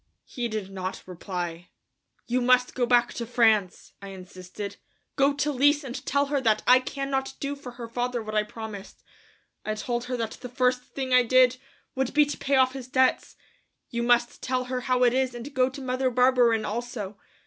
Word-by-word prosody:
He 240 -3 -4
did 215 -4 -5
not 185 -1 -5
reply. 175 -2 -6 0.6
"You 250 +1 0
must 250 0 +3
go 245 -2 0
back 240 0 +3
to 235 - -4
France," 220 -6 +2
I 200 - -8
insisted; 190 +1 -8 0.4
"go 275 0 +4
to 290 +1 -1
Lise 290 +2 +3
and 255 -2 -6
tell 280 +1 +2
her 280 -1 -1
that 220 -4 +2
I 250 +1 +7
cannot 270 0 -3
do 280 0 -3
for 260 -3 -10
her 240 -1 -8
father 245 0 -2
what 215 0 -7
I 215 - +3
promised. 210 -1 -9 0.6
I 215 - -2
told 240 +2 -3
her 250 0 -3
that 225 -2 -3
the 250 - -7
first 250 +1 +1
thing 260 -2 -4
I 250 - +7
did 255 +1 +4 0.4
would 265 0 -2
be 300 0 +6
to 290 - -5
pay 275 0 +1
off 260 -1 +4
his 265 -2 -7
debts. 260 -1 +1 0.6
You 235 -1 -2
must 240 0 +2
tell 255 0 -1
her 250 0 -3
how 250 0 +1
it 245 -1 +4
is, 260 -1 0
and 245 +4 -8
go 255 -1 +2
to 265 +1 -9
Mother 255 0 0
Barberin 245 -3 +3
also. 215 -3 -5
245 Hz, 195 wpm, -26 LUFS, 220-260 Hz, 0.6 s, I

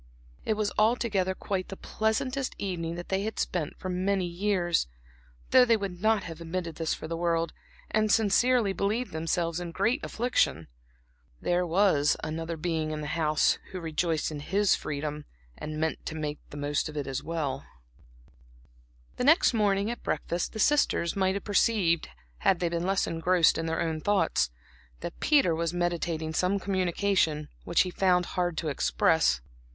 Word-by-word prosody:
It 220 - +1
was 210 -1 -1
altogether 215 -4 +2
quite 185 -1 -3
the 195 - -8
pleasantest 255 +5 -1
evening 170 -4 -3
that 175 0 -7
they 190 0 0
had 220 +1 -4
spent 165 -5 -2
for - - -6
many 185 +1 0
years, 175 - 0 0.6
though 255 - +8
they 235 -2 +4
would 190 -4 -5
not 220 -2 +3
have 165 0 -8
admitted 170 -1 -4
this 165 -1 -1
for - - -8
the 165 - -3
world, 165 0 0 0.4
and 215 -1 +2
sincerely 225 0 +3
believed 215 +6 -1
themselves 165 +1 -1
in 175 -1 -5
great 225 - 0
affliction. 220 - 0 0.7
There 175 0 0
was 165 -5 +3
another 165 +1 -4
being 160 -1 -1
in 155 0 -4
the 150 - -4
house 155 -2 +2
who 185 - -6
rejoiced 160 -1 -1
in 150 - -5
his 195 +7 +2
freedom 150 0 -4 0.3
and 155 0 -6
meant 160 0 -1
to 155 - -4
make 150 -1 -3
the 145 - -9
most 145 +1 -1
of 150 - -8
it. 145 - -1
The 140 0 -3 1.6
next 305 0 +5
morning 205 -1 +1
at 240 - -7
breakfast 170 0 -2
the 220 - -6
sisters 280 - +2
might 190 -1 +1
have 200 - -4
perceived 200 -5 +2 0.3
had 185 - +2
they 175 - 0
been 170 +1 -2
less 195 0 +2
engrossed 165 +1 +3
in 165 - -2
their 165 0 -1
own 160 -1 -1
thoughts, 205 - +2 0.5
that 170 - -6
Peter 280 - +4
was 165 +1 -1
meditating 170 -2 -1
some 185 +4 +1
communication, 185 -5 0 0.2
which 170 - +3
he 180 - -1
found 180 -1 +2
it - - -9
hard 175 -2 -1
to 160 - -2
express. 65 - +2
175 Hz, 165 wpm, -28 LUFS, 160-200 Hz, 1.6 s, though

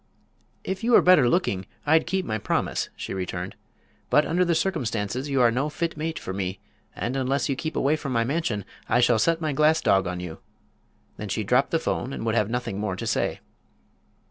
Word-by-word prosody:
"If 190 +2 -4
you 240 +1 +2
were - - +7
better 155 -9 +6
looking 100 - 0 0.2
I'd 160 +2 +4
keep 190 -1 -1
my 110 -6 -2
promise," - - -1
she - - -5
returned. 90 0 -4 0.6
"But 150 - +4
under 180 +2 +2
the 170 -2 +1
circumstances 130 - -1
you 135 -2 +2
are 120 -1 +5
no 135 +6 0
fit 165 +2 -3
mate 160 +1 -3
for 95 - -5
me, 95 -1 -3 0.4
and 120 +3 -3
unless 135 +2 0
you 135 - +1
keep 155 +4 -4
away 145 +3 +2
from 155 -3 -5
my 115 -2 +2
mansion 125 - -1 0.2
I 120 - +4
shall 120 -2 +4
set 165 +6 +2
my 155 -2 -1
glass 155 +3 +4
dog 95 -1 +2
on 90 0 -3
you!" 90 -3 -7 0.8
Then 105 - -6
she 110 +3 -1
dropped 125 +7 +2
the 165 - +2
'phone 135 -4 -2
and - - -5
would 110 - +1
have 105 -2 +1
nothing 120 -4 -3
more 105 -3 -2
to - - -5
say. - - -1
130 Hz, 210 wpm, -25 LUFS, 105-160 Hz, 0.8 s, were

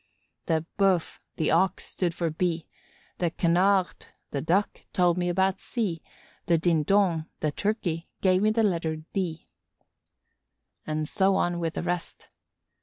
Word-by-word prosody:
The 160 -1 +1
Bœuf, 190 -4 +2 0.2
the 155 - +1
Ox, 190 0 +2
stood 175 -3 -2
for 170 -2 -1
B; 165 0 -1 0.5
the 175 - +1
Canard, 180 +3 +2 0.2
the 140 - -2
Duck, 185 +7 0
told 175 -2 +3
me 175 0 0
about 190 +1 +1
C; 195 -10 -2 0.5
the 170 - +4
Dindon, 170 +1 +2
the 155 - +1
Turkey, 175 -3 -2
gave 185 -1 +3
me 215 - +4
the 225 +1 +2
letter 165 -5 0 0.2
D. 170 -5 -3 1.4
And 155 0 -1
so 195 +2 +2
on 175 -2 0
with 165 -1 -2
the - - -2
rest. 175 -1 -4
175 Hz, 140 wpm, -27 LUFS, 165-190 Hz, 1.4 s, the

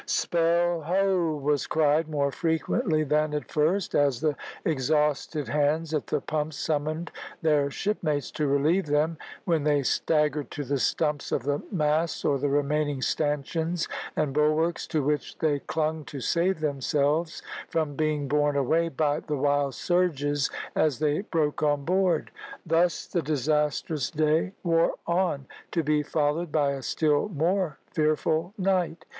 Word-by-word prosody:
"Spell, 170 0 +1
ho!" 180 -1 +1
was 145 0 0
cried 155 +1 +2
more 140 -2 0
frequently 160 - 0
than 150 +1 +1
at 150 - -4
first, 165 +6 +1
as 140 -4 +2
the 150 0 0 0.3
exhausted 150 0 0
hands 150 +2 0
at 150 - -1
the - - 0
pumps 155 0 -3
summoned 155 +2 -2 0.3
their 150 -3 +3
shipmates 150 -4 -2
to 150 - -1
relieve 150 +6 +2
them, 150 +2 +1 0.3
when 165 -4 +1
they 145 -1 +2
staggered 150 +2 +1
to 145 - -5
the 140 0 -1
stumps 150 +2 0
of 120 - 0
the 145 +1 -1
masts 155 -2 0
or 140 -1 +2
the 145 +1 0
remaining 145 0 0
stanchions 155 +4 -1 0.3
and 150 -3 0
bulwarks, 155 +3 +1
to 155 -4 0
which 150 +1 -1
they 150 -3 +1
clung 155 +1 -2
to 140 - -7
save 170 +7 0
themselves 150 +2 0 0.3
from 155 -3 -1
being 150 -1 0
borne 145 +1 +2
away 160 +5 +2
by 150 0 0
the 150 -2 -3
wild 140 -1 +1
surges 145 -6 +1 0.3
as 150 -5 +2
they 150 +3 +1
broke 155 -8 -1
on 145 -2 +1
board. 180 -1 +1 0.3
Thus 165 +1 +2
the 175 - -1
disastrous 150 -1 0
day 155 +3 +1
wore 165 -2 +2
on, 170 -5 0 0.3
to 165 - 0
be 150 0 +2
followed 150 +2 -1
by 145 -2 +2
a 135 -1 -4
still 150 +6 +1
more 175 -1 0
fearful 155 +4 0
night. 185 -4 0
155 Hz, 150 wpm, -27 LUFS, 145-165 Hz, 0.3 s, their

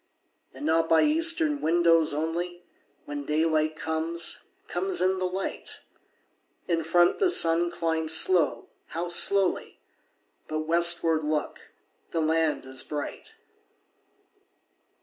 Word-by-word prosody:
And 135 +2 -9
not 165 +1 +1
by 165 - +4
eastern 320 -1 +2
windows 165 -1 +2
only, 170 +4 -4 0.4
When 145 0 -6
daylight 155 +1 0
comes, 160 +1 -2 0.3
comes 385 -1 -3
in 185 +1 0
the 185 - -1
light; 190 +2 -5 0.9
In 165 -2 -1
front 175 +2 +2
the 385 - +2
sun 170 - +4
climbs 160 -2 -2
slow, 160 -7 +2 0.2
how 170 +2 -5
slowly! 195 +2 +3 0.7
But 155 0 -3
westward, 165 0 +3
look, 150 0 -4 0.4
the 165 - -3
land 160 -2 0
is 130 0 -5
bright! 150 -1 -7
165 Hz, 110 wpm, -26 LUFS, 155-175 Hz, 0.9 s, by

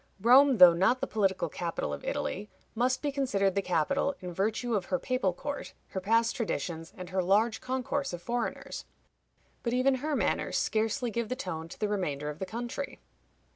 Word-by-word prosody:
Rome, 255 +5 +6
though 180 -3 +10
not 190 +9 +3
the - - -1
political 195 -3 0
capital 170 -1 -3
of - - -6
Italy, - - -3 0.2
must 250 +4 +1
be 290 - 0
considered 205 -9 +1
the 200 - +1
capital, 195 - +1
in 180 -1 -6
virtue 220 +6 -1
of 200 -4 0
her 275 - 0
papal 255 -8 0
court, 285 +11 -6
her 190 - -4
past 230 +3 +2
traditions, 165 - -3
and 180 -1 -7
her 190 0 +1
large 210 +5 +2
concourse 260 +2 -2
of 175 - -5
foreigners. 235 +6 -3 0.8
But 235 - -1
even 255 +2 +3
her 305 0 -1
manners - - 0
scarcely 225 +3 0
give 235 0 -2
the 255 - -1
tone 165 -9 -5
to - - -11
the 210 - +1
remainder 150 -8 -2
of 150 - -11
the 190 - -3
country. 240 +6 -5
220 Hz, 185 wpm, -30 LUFS, 185-255 Hz, 0.8 s, though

